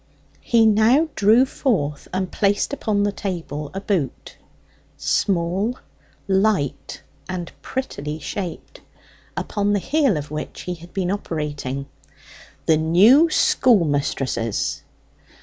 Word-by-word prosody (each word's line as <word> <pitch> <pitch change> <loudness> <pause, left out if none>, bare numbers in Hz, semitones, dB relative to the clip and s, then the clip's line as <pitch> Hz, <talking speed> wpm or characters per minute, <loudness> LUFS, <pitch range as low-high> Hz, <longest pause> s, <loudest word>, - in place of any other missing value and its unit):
He 230 -2 +3
now 225 +9 +4
drew 220 +6 +5
forth 150 - -1
and 185 0 -2
placed 205 +6 +1
upon 210 -7 0
the 205 - +1
table 165 -7 -5
a - - -1
boot 190 -9 -3 0.6
small, 195 +6 0 0.5
light, 190 -7 0 0.3
and 180 -2 -4
prettily 155 - -4
shaped 175 +2 -6 0.6
upon 205 -1 0
the - - +3
heel 275 - +1
of 145 0 -6
which 150 0 -5
he 180 - -4
had 170 0 -12
been 185 -2 -1
operating. 145 -8 -3 0.8
"The 160 - +4
new 205 - +5
schoolmistress's!" 145 - +1
190 Hz, 110 wpm, -22 LUFS, 155-215 Hz, 0.8 s, drew